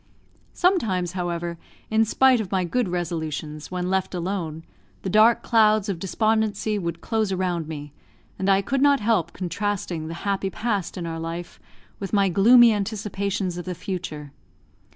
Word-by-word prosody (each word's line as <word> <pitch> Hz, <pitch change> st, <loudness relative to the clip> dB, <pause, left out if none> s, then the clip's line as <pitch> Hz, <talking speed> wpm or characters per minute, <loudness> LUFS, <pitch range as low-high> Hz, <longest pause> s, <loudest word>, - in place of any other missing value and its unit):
Sometimes, 215 Hz, -, +1 dB
however, 175 Hz, -2 st, -3 dB, 0.3 s
in 220 Hz, +1 st, +4 dB
spite 255 Hz, +2 st, +4 dB
of 195 Hz, -, -7 dB
my 190 Hz, -2 st, +1 dB
good 210 Hz, +4 st, 0 dB
resolutions, 160 Hz, -4 st, -4 dB
when 180 Hz, 0 st, -3 dB
left 190 Hz, -1 st, 0 dB
alone, 170 Hz, -3 st, -3 dB, 0.4 s
the 190 Hz, -, -2 dB
dark 220 Hz, +3 st, +5 dB
clouds 215 Hz, -2 st, +3 dB
of 185 Hz, -4 st, -2 dB
despondency 215 Hz, +2 st, 0 dB
would 170 Hz, -2 st, -4 dB
close 220 Hz, -3 st, -1 dB
around 180 Hz, -4 st, -1 dB
me, 145 Hz, -2 st, -7 dB, 0.5 s
and 190 Hz, -, 0 dB
I 195 Hz, 0 st, +4 dB
could 270 Hz, +6 st, -1 dB
not 285 Hz, 0 st, +5 dB
help 205 Hz, -6 st, +1 dB
contrasting 180 Hz, -2 st, -3 dB
the 165 Hz, -, -5 dB
happy 195 Hz, -1 st, 0 dB
past 205 Hz, -4 st, -2 dB
in 175 Hz, -, -4 dB
our 165 Hz, -1 st, -4 dB
life 165 Hz, +1 st, -6 dB, 0.4 s
with 195 Hz, 0 st, -6 dB
my 200 Hz, -2 st, +3 dB
gloomy 230 Hz, +5 st, +7 dB
anticipations 200 Hz, -3 st, -2 dB
of 175 Hz, -, -7 dB
the 180 Hz, -1 st, -4 dB
future. 170 Hz, -5 st, -6 dB
190 Hz, 155 wpm, -24 LUFS, 170-215 Hz, 0.5 s, gloomy